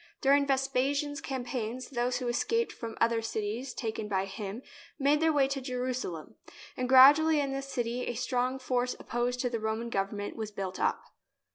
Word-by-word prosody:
During 280 +1 +4
Ves 270 -1 +2
pasian's 280 +2 0
campaigns 250 -1 -4
those 245 0 0
who 250 -1 -3
escaped 460 - 0
from 230 -2 -7
other 230 0 +2
cities 225 +3 -3
taken 220 -3 -4
by 195 -2 0
him 200 +4 -6 0.3
made 290 +1 +3
their 320 0 +3
way 285 -3 +3
to 275 -1 -2
Jerusalem, 250 - -4 0.4
and 255 0 -2
gradually 295 +4 +8
in 280 -1 -1
this 275 0 -4
city 245 -2 -2
a 240 - -2
strong 250 +2 0
force 250 -1 -1
opposed 245 +1 -2
to 245 - 0
the 230 - -1
Roman 220 +2 -2
government 205 0 -2
was 220 -2 -4
built 195 -3 -5
up. - - 0
250 Hz, 175 wpm, -30 LUFS, 225-270 Hz, 0.4 s, gradually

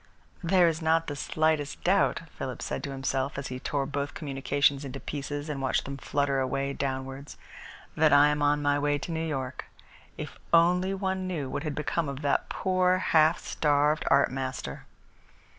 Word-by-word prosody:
"There 175 0 +4
is 165 0 -1
not 165 +1 +2
the 145 - -4
slightest 155 0 0
doubt," 190 -1 +2
Philip 130 -2 -5
said - - -4
to - - -5
himself, 135 0 -2
as 140 -1 -4
he 130 0 -5
tore 140 +1 -1
both 140 0 -3
communications 140 -1 0
into 135 0 -6
pieces 145 +1 -5
and 145 -3 -4
watched 130 - 0
them 140 0 -5
flutter 140 0 0
away 135 +1 -1
downwards, 135 +1 -4 0.6
"that 155 0 +4
I 145 +1 +7
am 150 0 -1
on 145 0 +2
my 145 0 +2
way 145 0 +1
to 155 - -6
New 160 0 -2
York. 135 -5 -4 0.5
If - - -7
only 180 +3 +4
one 190 -1 -2
knew 150 -8 -3
what - - -2
had 150 -2 -3
become 155 +1 -1
of 140 +1 -6
that 140 - +1
poor, 185 -1 +2
half 160 -2 +4
starved 150 0 +1
art 140 -2 +4
master!" 130 - -5
145 Hz, 175 wpm, -28 LUFS, 135-160 Hz, 0.6 s, I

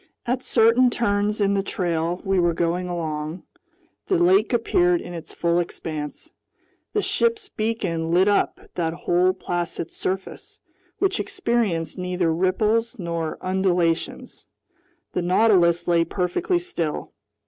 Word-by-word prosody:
At 250 +1 -1
certain 235 +1 +4
turns 210 -2 0
in 200 -1 +2
the 200 - +2
trail 175 -2 -2
we 195 -1 +2
were 175 -1 +2
going 175 +2 0
along, 160 -1 -4 0.6
the 380 - +2
lake 360 +1 +4
appeared 180 -7 +2
in 175 - -8
its 165 -2 -8
full 170 0 +1
expanse. 155 -3 -5 0.6
The 415 - +1
ship's 460 -3 0
beacon 195 -8 -2
lit 180 +3 +4
up 205 - +2
that 165 -2 -1
whole 175 +2 +2
placid 175 -3 -4
surface, 190 0 -5 0.4
which 390 0 +1
experienced 235 - -1
neither 180 -2 0
ripples 210 +6 +1
nor 170 -4 -3
undulations. 180 -3 -1 0.7
The - - 0
Nautilus 175 -2 +3
lay 170 -1 +4
perfectly 180 - 0
still. 175 - -3
180 Hz, 125 wpm, -23 LUFS, 170-225 Hz, 0.7 s, certain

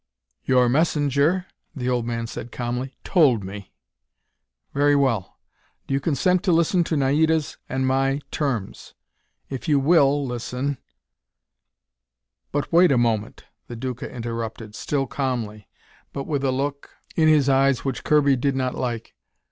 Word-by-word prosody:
"Your 125 -1 +4
messenger," 150 +4 +2 0.3
the 125 -3 -3
old 120 -2 0
man 115 -1 -2
said 115 +1 -7
calmly, 125 +2 -4
"told 135 - +3
me." 100 0 -8 1.0
"Very 145 +1 +3
well. 125 -9 0 0.5
Do - - -3
you 135 - +2
consent 170 +5 +1
to 190 - +1
listen 170 +2 +3
to 160 - -1
Naida's 155 +3 +1
and 130 0 -1
my 135 +1 +1
terms? 125 -10 -3 0.6
If 130 -4 -5
you 145 -3 +4
will 145 -1 +3
listen 125 +2 -3 0.8
" - - -59
"But 145 +3 -2
wait 175 -1 +6
a 130 - +3
moment," 115 -3 0 0.2
the 120 - -7
Duca 125 +1 -5
interrupted, 115 -2 -5
still 135 +5 -1
calmly, 120 -7 -3 0.5
but 140 - -3
with 145 -3 -2
a 135 - +2
look 140 +2 -3 0.3
in 160 -1 +3
his 150 -3 +4
eyes 135 -1 +3
which 135 -2 -3
Kirby 145 -2 +4
did 135 +2 0
not 130 -1 -1
like. 120 -3 -4
135 Hz, 145 wpm, -23 LUFS, 120-145 Hz, 1.0 s, wait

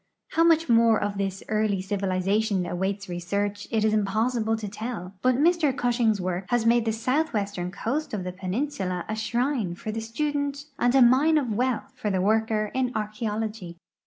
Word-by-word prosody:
How 330 - +2
much 330 -1 +4
more 230 -2 +5
of 205 -1 -2
this 195 0 -2
earlv 215 -3 0
civilization 195 0 0
awaits 190 +3 -2
research 200 +4 -3
it 220 -2 +1
is 215 - +2
impossible 220 +2 +1
to 215 -1 -5
tell; 210 -3 -6
but 255 +2 +3
Mr 305 -1 +2
Cushing's 240 -5 +2
work 185 0 -2
has 240 -2 +1
made 235 0 +4
the 225 - +1
southwestern 220 - -1
coast 260 +11 -3
of 205 -4 -3
the 180 0 -5
penin 195 +10 -2
sula 185 -10 -3
a 220 - -2
shrine 225 -2 -1
for 215 - -5
the 225 +1 -4
student 285 +4 -2
and 245 +2 +3
a 265 - +7
mine 275 +6 +5
of 255 -7 0
wealth 255 +3 -1
for 220 -5 -3
the 190 -2 0
worker 215 +1 +1
in 255 -1 0
archeology. 215 -4 -3
220 Hz, 180 wpm, -26 LUFS, 200-250 Hz, -, a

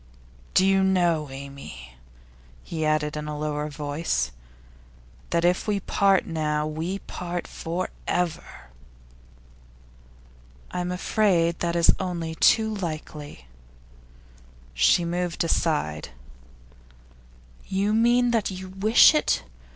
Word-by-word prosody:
'Do 190 - +5
you 195 0 +4
know, 175 -6 +2
Amy,' 135 - -9 0.7
he 160 -1 -4
added 155 -1 0
in 150 0 -5
a 150 0 -4
lower 150 0 -2
voice, 150 +2 -2 1.0
'that 170 0 +1
if 180 +4 +1
we 205 -1 +1
part 195 0 +2
now, 150 -2 -1
we 160 +5 -3
part 175 -2 -5
for 175 +3 -4 0.2
ever?' 165 - -3 2.0
'I'm 180 0 -2
afraid 180 -3 +1
that 170 0 -1
is 170 -1 +5
only 170 -3 -3
too 220 +6 +3
likely.' 155 - -6 1.3
She 65 - +4
moved 175 0 -1
aside. 150 - -1 1.6
'You 200 +2 0
mean 240 +2 +3
that 230 -3 +1
you 185 0 -7
wish 210 +9 +6
it. 305 - +1
170 Hz, 105 wpm, -25 LUFS, 150-190 Hz, 2.0 s, wish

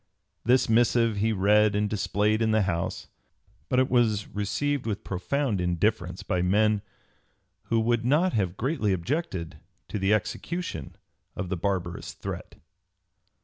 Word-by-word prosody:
This 125 +2 +3
missive 115 -1 +3
he 110 +2 +2
read 105 +1 +4
and 105 0 +1
displayed 105 +1 0
in 110 - +2
the 110 -1 +3
House, 90 -1 -2 0.6
but 125 - +1
it 130 0 +4
was 110 -5 +2
received 125 +6 -1
with 105 -3 -3
profound 105 +3 -1
indifference 90 +1 0
by 90 -2 0
men 105 +3 +3 0.8
who 115 - +1
would 115 +1 +1
not 150 +9 +3
have 95 -4 0
greatly 125 -6 0
objected 95 - -3 0.3
to 105 - -3
the 95 +1 +1
execution 110 - -2 0.4
of 90 - -4
the 95 - 0
barbarous 90 -1 -3
threat. - - -7
105 Hz, 140 wpm, -27 LUFS, 95-120 Hz, 0.8 s, read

